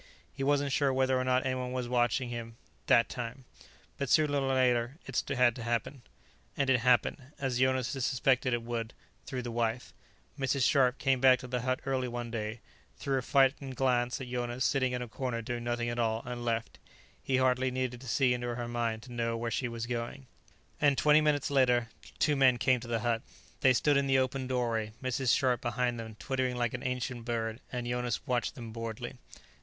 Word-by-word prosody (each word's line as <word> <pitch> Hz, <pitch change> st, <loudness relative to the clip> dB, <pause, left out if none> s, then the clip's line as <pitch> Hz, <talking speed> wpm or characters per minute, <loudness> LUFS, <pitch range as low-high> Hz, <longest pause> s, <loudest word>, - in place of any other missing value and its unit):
He 135 Hz, -, -4 dB
wasn't 140 Hz, 0 st, +2 dB
sure 140 Hz, +1 st, +2 dB
whether 130 Hz, 0 st, +2 dB
or -, -, 0 dB
not 130 Hz, 0 st, +1 dB
anyone 130 Hz, -1 st, -2 dB
was 125 Hz, -1 st, -2 dB
watching 120 Hz, 0 st, +1 dB
him, 115 Hz, -1 st, -6 dB, 0.3 s
that 115 Hz, -, +5 dB
time. 125 Hz, +2 st, -6 dB, 0.5 s
But 140 Hz, -2 st, -2 dB
sooner 150 Hz, 0 st, +4 dB
or 135 Hz, -1 st, 0 dB
later 125 Hz, 0 st, +2 dB
it 135 Hz, -, -1 dB
had 125 Hz, -4 st, +3 dB
to 120 Hz, -, -6 dB
happen. 120 Hz, +3 st, -2 dB, 0.6 s
And 140 Hz, -2 st, +2 dB
it 125 Hz, -, +4 dB
happened, 125 Hz, +2 st, +2 dB, 0.2 s
as 130 Hz, -3 st, -1 dB
Jonas 130 Hz, -1 st, +2 dB
had 135 Hz, -, -4 dB
suspected 130 Hz, 0 st, +2 dB
it 120 Hz, -1 st, 0 dB
would, 115 Hz, -1 st, -4 dB, 0.3 s
through 130 Hz, -2 st, -4 dB
the 120 Hz, -, -4 dB
wife. 115 Hz, +1 st, -2 dB, 0.5 s
Mrs. 135 Hz, 0 st, +1 dB
Scharpe 130 Hz, -2 st, +3 dB
came 135 Hz, -2 st, +1 dB
back 130 Hz, -1 st, +7 dB
to 125 Hz, -, -9 dB
the 125 Hz, -1 st, -2 dB
hut 130 Hz, +1 st, -1 dB
early 130 Hz, -2 st, 0 dB
one 120 Hz, -1 st, -5 dB
day, 110 Hz, 0 st, -4 dB, 0.4 s
threw 135 Hz, -1 st, 0 dB
a -, -, -3 dB
frightened 135 Hz, 0 st, +2 dB
glance 125 Hz, -1 st, +1 dB
at 130 Hz, -, -6 dB
Jonas 125 Hz, +1 st, -2 dB
sitting 130 Hz, -2 st, +1 dB
in 125 Hz, 0 st, -2 dB
a -, -, -7 dB
corner 125 Hz, +1 st, -3 dB
doing 120 Hz, +1 st, -4 dB
nothing 120 Hz, 0 st, -1 dB
at 120 Hz, 0 st, -2 dB
all, 115 Hz, -1 st, 0 dB
and 120 Hz, -1 st, -5 dB
left. 115 Hz, -1 st, -2 dB, 0.4 s
He 130 Hz, -, 0 dB
hardly 130 Hz, 0 st, +2 dB
needed 125 Hz, -1 st, -3 dB
to 130 Hz, -, -10 dB
see 130 Hz, 0 st, +3 dB
into 120 Hz, -1 st, -3 dB
her 120 Hz, -1 st, -4 dB
mind 115 Hz, -2 st, -2 dB
to 125 Hz, -, -10 dB
know 115 Hz, -1 st, -1 dB
where 115 Hz, 0 st, -3 dB
she 125 Hz, +3 st, -1 dB
was 115 Hz, -1 st, -4 dB
going. 120 Hz, +2 st, -4 dB, 0.5 s
And 140 Hz, -2 st, +3 dB
twenty 150 Hz, 0 st, +5 dB
minutes 145 Hz, -2 st, +1 dB
later 125 Hz, -4 st, +3 dB, 0.3 s
two 150 Hz, -1 st, +2 dB
men 130 Hz, -3 st, +5 dB
came 130 Hz, +1 st, +3 dB
to 120 Hz, -, -9 dB
the 115 Hz, -2 st, -1 dB
hut. 115 Hz, -1 st, 0 dB, 0.4 s
They 130 Hz, -, +5 dB
stood 145 Hz, +3 st, +3 dB
in 140 Hz, 0 st, +1 dB
the 135 Hz, 0 st, +4 dB
opened 130 Hz, 0 st, -1 dB
doorway, 115 Hz, -4 st, -1 dB
Mrs. 130 Hz, -1 st, +2 dB
Scharpe 125 Hz, -2 st, +1 dB
behind 120 Hz, 0 st, -1 dB
them 110 Hz, -1 st, -7 dB
twittering 130 Hz, +2 st, -2 dB
like 120 Hz, -2 st, -1 dB
an 125 Hz, -, -4 dB
ancient 125 Hz, -2 st, -3 dB
bird, 115 Hz, -1 st, -2 dB
and 125 Hz, -1 st, -3 dB
Jonas 120 Hz, -1 st, -2 dB
watched 125 Hz, -3 st, -1 dB
them 115 Hz, -2 st, -8 dB
boredly. 115 Hz, -1 st, -6 dB
125 Hz, 205 wpm, -31 LUFS, 120-130 Hz, 0.6 s, back